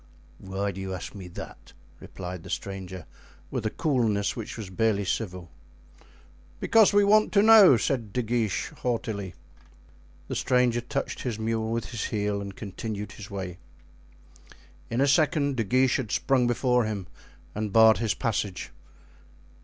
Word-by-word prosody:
"Why 100 +1 -3
do 95 +1 -8
you 95 -1 -4
ask 90 - -7
me 95 -4 -9
that?" 90 - -10 0.3
replied 90 -2 -7
the - - -11
stranger, 95 -3 -5 0.5
with 110 - -2
a - - 0
coolness 115 -9 0
which 115 0 -6
was 105 -5 -7
barely 100 0 +1
civil. 90 -4 -3 1.1
"Because 225 -3 +5
we 205 0 +4
want 215 +1 +4
to 200 -1 +5
know," 215 - +8
said 115 -2 -1
De 125 +4 -1
Guiche, 110 -3 -1
haughtily. 105 -6 -3 0.9
The - - -4
stranger 125 -2 +2
touched 135 +3 -4
his 120 -4 -3
mule 110 0 -1
with 115 -2 -2
his 120 -3 -3
heel 105 -1 -1
and 100 -1 -7
continued 105 0 -6
his 105 - -10
way. 95 -3 -6 1.3
In 120 +3 0
a 140 - +4
second 145 -1 +2
De 115 - 0
Guiche 130 +5 +2
had 120 -6 -4
sprung 130 -3 +2
before 125 0 +2
him 105 -4 -4 0.5
and 105 -1 -3
barred 110 +1 +6
his 115 -2 0
passage. 105 -5 -2
110 Hz, 155 wpm, -27 LUFS, 100-125 Hz, 1.3 s, know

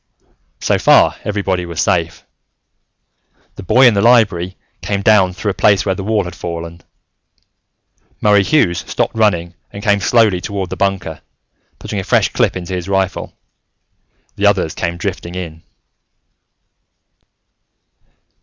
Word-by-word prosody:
So - - +1
far, - - +4
everybody 100 -3 -2
was 85 -2 -6
safe. - - -1 1.3
The - - -10
boy 125 +8 +4
in 120 - +6
the 100 - +1
Library 100 -6 +2 0.2
came 100 -1 -2
down 95 -4 +4
through 100 +3 -2
a - - -10
place 100 -2 +4
where 95 - +1
the 95 - -6
wall 105 0 0
had 90 - -7
fallen. 85 0 -7 1.4
Murray 105 -1 +4
Hughes 95 - +2
stopped - - -3
running 90 -6 +1 0.2
and 100 - -9
came 100 -2 +2
slowly 105 -2 +2
toward 100 -3 -4
the - - -3
bunker, 95 -5 -2 0.6
putting 105 - -5
a - - -4
fresh - - +2
clip - - +1
into 90 0 -6
his 90 +1 -4
rifle. 95 -1 -2 1.0
The 100 - +2
others 95 -6 +1
came 85 +1 -3
drifting 90 -1 -5
in. 85 -3 -7
95 Hz, 135 wpm, -16 LUFS, 90-105 Hz, 1.4 s, in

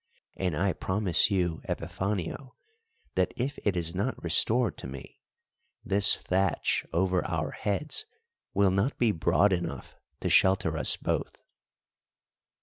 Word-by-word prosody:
And 90 -5 -1
I 95 +1 +1
promise 95 +1 +1
you, 90 -5 0
Epifanio, 100 +6 -3 0.6
that - - 0
if 135 +4 -2
it 100 -3 +1
is 85 -1 -1
not 100 +8 -2
restored 110 +5 +3
to - - -6
me, 65 0 -10 0.6
this 100 +1 +4
thatch 95 -1 0
over 90 +1 +1
our - - -2
heads 150 - -1 0.5
will 100 -1 +3
not 100 +9 0
be 120 -3 +3
broad 95 +2 +3
enough 90 -1 -4 0.3
to - - -1
shelter 95 -3 +4
us 75 -5 +1
both." - - -3
95 Hz, 130 wpm, -28 LUFS, 85-105 Hz, 0.6 s, this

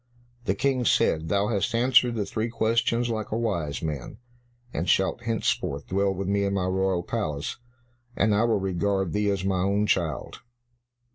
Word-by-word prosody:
The 95 - +1
King 130 +2 +1
said, 80 -7 +2
"Thou 100 +2 +1
hast 105 0 0
answered 120 0 +4
the 105 -3 -1
three 110 +3 -2
questions 115 +1 +1
like 110 -1 -3
a 110 - 0
wise 85 -12 -2
man, 75 -5 -4 0.6
and 85 +4 -2
shalt 95 +2 +1
henceforth 110 -10 -1
dwell 100 +1 +1
with 95 0 -4
me 100 0 +1
in 100 0 0
my 95 -2 0
royal 95 -1 0
palace, 75 -2 -3 0.6
and 105 +1 +2
I 105 +3 +3
will 115 -3 +2
regard 95 -1 -1
thee 105 0 +1
as 95 -2 -1
my 95 -1 +1
own 100 +2 +1
child." 85 -7 -1
100 Hz, 170 wpm, -26 LUFS, 90-110 Hz, 0.6 s, answered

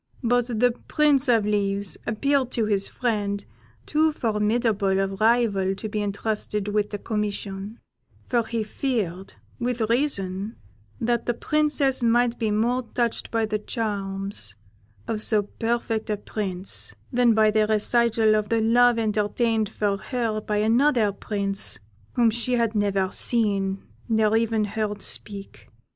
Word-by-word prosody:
But 245 0 +2
the 245 0 +2
Prince 295 -2 +3
of 230 -4 +3
Leaves 200 -2 0
appeared 265 +4 +1
to 230 - +1
his 200 -2 +2
friend 205 -4 -2 0.4
too 310 +1 +2
formidable 210 -4 +1
a 195 - +2
rival 200 -1 +2
to 215 - -5
be 210 0 -2
entrusted 210 0 -2
with 210 0 0
the 205 - -4
commission; 205 -1 -4 0.5
for 240 -2 +2
he 230 -2 -1
feared, 210 -6 -3 0.2
with 240 -2 -1
reason, 205 -6 -1 0.4
that 235 0 0
the 240 - +1
Princess 290 -2 +1
might 240 0 +2
be 225 -2 0
more 235 +4 +1
touched 235 -2 -1
by 225 -1 +1
the 215 0 -2
charms 195 - -3 0.5
of 215 -1 -2
so 215 -1 +1
perfect 225 +1 -2
a 210 - 0
prince 195 -2 -3 0.2
than 240 -2 +4
by 215 -1 +4
the 215 0 +2
recital 220 0 +3
of 210 -1 0
the 230 - +2
love 240 +2 +4
entertained 220 0 0
for 205 -1 -1
her 225 -1 -2
by 210 0 -2
another 230 +1 +3
prince 200 -1 -3 0.4
whom 235 -2 +3
she 235 +2 -1
had 230 -2 +1
never 200 -2 +1
seen 195 -4 +1 0.3
nor 220 -1 +3
even 225 -1 +1
heard 210 -1 -3
speak. 200 -1 -6
220 Hz, 140 wpm, -24 LUFS, 205-235 Hz, 0.5 s, than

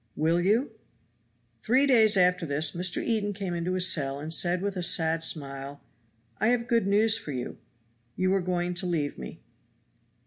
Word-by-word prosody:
"Will 165 +3 +1
you?" 220 +9 +1 0.9
Three 255 +5 +3
days 220 -6 +4
after 180 -1 +3
this 150 +2 0
Mr. 180 +1 0
Eden 210 -3 -1
came 190 -2 -5
into 170 +1 -2
his 185 0 +2
cell 140 -3 -3
and 155 +2 -5
said 175 +2 0
with 200 -1 -2
a 180 - -3
sad 165 -1 +2
smile, 140 -3 -4 0.6
"I 215 - +1
have 235 0 +1
good 230 -5 +1
news 215 +2 +3
for 155 - -7
you; 125 -1 -6 0.6
you 185 +1 +1
are 195 - +1
going 180 0 -2
to 180 +1 -2
leave 155 -5 -2
me. - - -9
180 Hz, 175 wpm, -27 LUFS, 160-205 Hz, 0.9 s, days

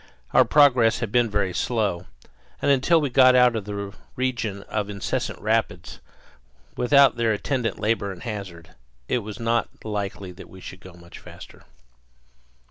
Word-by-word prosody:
Our - - +6
progress 125 -6 +4
had 115 -4 -4
been 120 -1 +2
very 100 -3 -1
slow; 100 -7 -1 0.5
and - - +2
until 140 +5 +3
we 145 -4 -2
got 130 0 +6
out 125 -1 +5
of 110 -3 -4
the 100 -1 -6 0.2
region 115 -6 -2
of 105 -1 -3
incessant 100 -1 -3
rapids, - - -2 0.8
with 125 - -2
their 125 -5 +4
attendant 120 +2 -2
labor 105 -2 -1
and 90 - -10
hazard, 95 -7 -7 0.4
it - - 0
was 105 -2 -8
not 115 0 -2
likely 100 -3 -4
that 90 - -13
we 95 - -13
should 95 0 -10
go 95 0 -13
much 85 0 -14
faster. - - -14
110 Hz, 155 wpm, -24 LUFS, 100-125 Hz, 0.8 s, Our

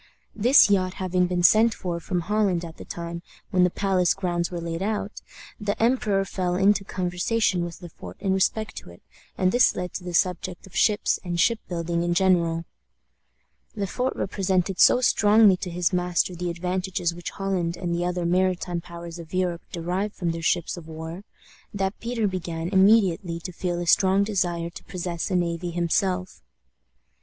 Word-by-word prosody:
This 240 +6 +6
yacht 185 -2 +1
having 185 -1 0
been 180 -1 -1
sent 220 +5 +5
for 175 -3 -4
from 175 +2 -2
Holland 190 -2 0
at 165 -1 -10
the - - -10
time 170 0 -6 0.3
when 180 -1 +3
the 180 - +4
palace 185 -2 +1
grounds 175 -3 -1
were 175 - -5
laid 165 0 -4
out, 210 0 -3 0.4
the 205 -1 -2
emperor 225 -5 +2
fell 180 -2 -2
into 195 +1 +3
conversation 185 +1 0
with 175 +1 -7
Le 175 - -8
Fort 90 - -11
in 190 - 0
respect 215 +3 0
to - - -8
it, 85 - -16 0.3
and 185 0 +2
this 245 +2 +4
led 180 0 -4
to 185 - -5
the 180 -1 -4
subject 180 0 -1
of 190 - -16
ships 210 -2 +2
and 175 -2 -3
ship 230 +4 +3
building 170 -1 -2
in 175 0 0
general. 170 -3 +2 1.1
Le 205 -2 -2
Fort 250 +6 -2
represented 190 -1 -1
so 250 - +6
strongly 215 -4 +5
to 180 - -6
his 175 +1 -1
master 180 0 +1
the 175 0 -3
advantages 180 0 -2
which 175 0 -6
Holland 180 -3 -2
and 175 -2 -3
the 170 +1 -1
other 180 0 -1
maritime 180 -1 0
powers 170 0 -9
of 170 +1 -8
Europe 180 -2 0
derived 180 +5 -3
from 175 -3 -1
their 165 0 -5
ships 170 +1 0
of 165 -2 -10
war, 160 +3 -7 0.5
that 195 0 -2
Peter 230 -2 -1
began 170 -3 -4
immediately 190 -3 +3
to 180 - -6
feel 175 0 -3
a 175 - -3
strong 190 +3 +4
desire 175 -5 -1
to - - -11
possess 175 -2 -4
a 185 - 0
navy 175 0 -1
himself. 180 +2 -1
180 Hz, 180 wpm, -25 LUFS, 170-195 Hz, 1.1 s, This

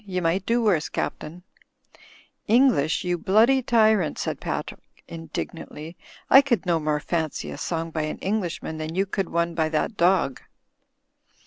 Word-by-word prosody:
"You 185 -3 -3
might 175 +3 0
do 235 +1 +2
worse, 180 -8 +1
Captain/' 170 +4 -5 1.0
"English, 230 - +3
you 175 -1 -1
bloody 225 +9 +4
t)rrant," 220 - +2
said - - -3
Patrick, - - -4 0.3
indig 165 -1 -6
nantly. 165 0 -9 0.3
"I 270 - +8
could 250 -7 -1
no 170 -2 +1
more 150 -1 -1
fancy 160 -1 -3
a - - -7
song 165 -1 -3
by 160 - -2
an - - -5
English 195 -3 -2
man 160 - -5
than 155 +1 -5
you 195 +1 +1
could 195 -1 -3
one 170 0 0
by 160 -1 0
that 160 +7 -2
dog." 170 -7 +2
175 Hz, 160 wpm, -24 LUFS, 160-210 Hz, 1.0 s, I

